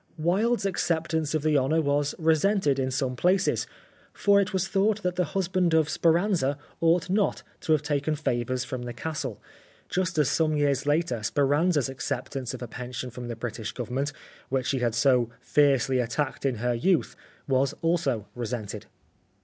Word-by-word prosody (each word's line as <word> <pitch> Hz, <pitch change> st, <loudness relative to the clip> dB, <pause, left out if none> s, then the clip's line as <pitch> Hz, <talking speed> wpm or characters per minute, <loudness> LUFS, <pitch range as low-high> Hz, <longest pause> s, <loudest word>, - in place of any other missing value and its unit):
Wilde's 200 Hz, +8 st, +1 dB
acceptance 160 Hz, -4 st, 0 dB
of 155 Hz, -, -1 dB
the 155 Hz, -2 st, +3 dB
honour 145 Hz, +5 st, +1 dB
was 145 Hz, -1 st, 0 dB
resented 160 Hz, -2 st, +2 dB
in 130 Hz, -1 st, 0 dB
some 130 Hz, -1 st, -1 dB
places, 185 Hz, +7 st, +2 dB, 0.5 s
for 200 Hz, 0 st, +4 dB
it 200 Hz, -, -2 dB
was 190 Hz, -1 st, 0 dB
thought 205 Hz, +2 st, +1 dB
that 180 Hz, -1 st, -1 dB
the 180 Hz, 0 st, +1 dB
husband 185 Hz, -3 st, +1 dB
of 160 Hz, -2 st, +3 dB
Speranza 165 Hz, -3 st, +2 dB, 0.2 s
ought 165 Hz, +1 st, +3 dB
not 200 Hz, +2 st, 0 dB, 0.2 s
to 160 Hz, -, -3 dB
have 150 Hz, -1 st, +1 dB
taken 145 Hz, +1 st, 0 dB
favours 130 Hz, -3 st, -1 dB
from 130 Hz, -1 st, -5 dB
the 120 Hz, 0 st, -5 dB
Castle, 140 Hz, -8 st, -4 dB, 0.5 s
just 180 Hz, -2 st, -1 dB
as 150 Hz, -3 st, +3 dB
some 155 Hz, +1 st, +1 dB
years 145 Hz, -1 st, +1 dB
later 145 Hz, -6 st, +1 dB
Speranza' 145 Hz, -, +2 dB
s 130 Hz, -, -2 dB
acceptance 130 Hz, -1 st, -4 dB
of 125 Hz, -, -7 dB
a -, -, -5 dB
pension 125 Hz, +2 st, -6 dB
from 120 Hz, +1 st, -7 dB
the 120 Hz, -, -4 dB
British 115 Hz, -1 st, -5 dB
Government 130 Hz, +4 st, -2 dB, 0.4 s
which 130 Hz, -1 st, 0 dB
she 135 Hz, -, 0 dB
had 120 Hz, -2 st, 0 dB
so 125 Hz, -2 st, +3 dB
fiercely 135 Hz, -3 st, +2 dB
attacked 130 Hz, +3 st, -1 dB
in 130 Hz, -, 0 dB
her 120 Hz, +2 st, 0 dB
youth, 165 Hz, +9 st, +1 dB, 0.3 s
was 135 Hz, +1 st, +2 dB
also 150 Hz, -, +1 dB
resented. 120 Hz, -3 st, -5 dB
145 Hz, 170 wpm, -27 LUFS, 125-170 Hz, 0.5 s, for